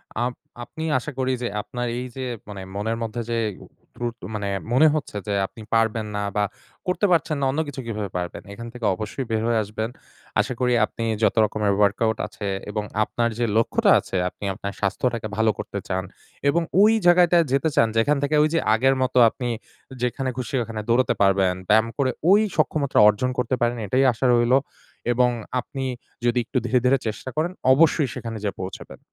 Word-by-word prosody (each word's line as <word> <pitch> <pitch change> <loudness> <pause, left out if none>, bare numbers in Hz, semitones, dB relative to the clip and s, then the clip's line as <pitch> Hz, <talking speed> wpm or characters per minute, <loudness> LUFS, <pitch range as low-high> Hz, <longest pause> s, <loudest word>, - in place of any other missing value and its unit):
Up 120 +2 -1 0.3
আপনি 160 +6 -8
আশা 150 +4 -4
করি 130 0 +1
যে, - - 0
আপনার 120 +3 -4
এই 125 - -3
যে - - -4 0.3
মানে 100 -2 -7
মনের 110 +3 -1
মধ্যে 115 +1 -3
যে 115 - +1 0.6
ত্রুধ 120 -1 -4 0.2
মানে 100 -1 -3 0.2
মনে 145 +6 +6
হচ্ছে 145 -8 -3
যে, 105 - -1
"আপনি 110 - -14
পারবেন 115 -1 +2
না" - - -1 0.2
বা 105 - +2 0.4
"করতে 180 +3 +1
পারছেন 160 -2 +2
না, - - +2
অন্য 145 - -2
কিছু 135 -2 -6
কিভাবে 105 -3 -3
পারবেন?" 90 -1 -4
এখান 115 +3 -8
থেকে 120 -3 -5
অবশ্যই 110 +7 -5
বের 110 -1 +1
হয়ে 115 -1 +2
আসবেন। 110 +2 -4 0.5
আশা - - +1
করি 125 -1 +2
আপনি 115 - -7 0.2
যত - - +3
রকমের 105 -1 0
ওয়ার্কআউট 105 +2 +2
আছে 100 - -6 0.2
এবং 105 0 -2 0.2
আপনার 115 +2 -1
যে 120 - +2
লক্ষ্যটা 115 - +3
আছে, - - -7
আপনি 100 - -9
আপনার 100 0 -6
স্বাস্থ্যটাকে 110 +3 -1
ভালো 110 0 +3
করতে 100 - -4
চান 95 -1 -1 0.5
এবং 170 +4 +2 0.2
ওই 215 +2 +7
জায়গাটায় 175 -1 +5
যেতে 140 +4 +2
চান, 115 - +5
যেখান 140 +6 +3
থেকে 150 +2 +1
ঐযে 160 +2 +2
আগের 135 +4 +3
মত 130 0 0 0.2
আপনি 125 +2 -5 0.5
যেখানে 130 +2 -1
খুশি 130 +2 -3
ওখানে 110 -1 -5
দৌড়াতে 125 +2 +3
পারবেন। 95 -2 +3
ব্যায়াম 110 +2 +5
করে 130 -3 +2 0.2
ওই 205 +2 +7 0.2
সক্ষমতা 150 -3 +1
অর্জন 105 +5 0
করতে 125 +1 0
পারেন। 120 0 +1
এটাই 130 +7 +2
আশা 120 +3 -3
রইলো। 120 +2 +4 0.5
এবং 125 +1 +3 0.3
আপনি 135 +2 -5 0.4
যদি 120 +1 +3
একটু 130 - -3
ধীরে 125 +1 +3
ধীরে 135 +2 +5
চেষ্টা 110 +4 -4
করেন, 160 +3 0 0.2
অবশ্যই 150 -1 +3
সেখানে 115 -1 -5
যেয়ে 100 - -3
পৌঁছাবেন। 95 - -8
120 Hz, 185 wpm, -23 LUFS, 110-135 Hz, 0.6 s, ওই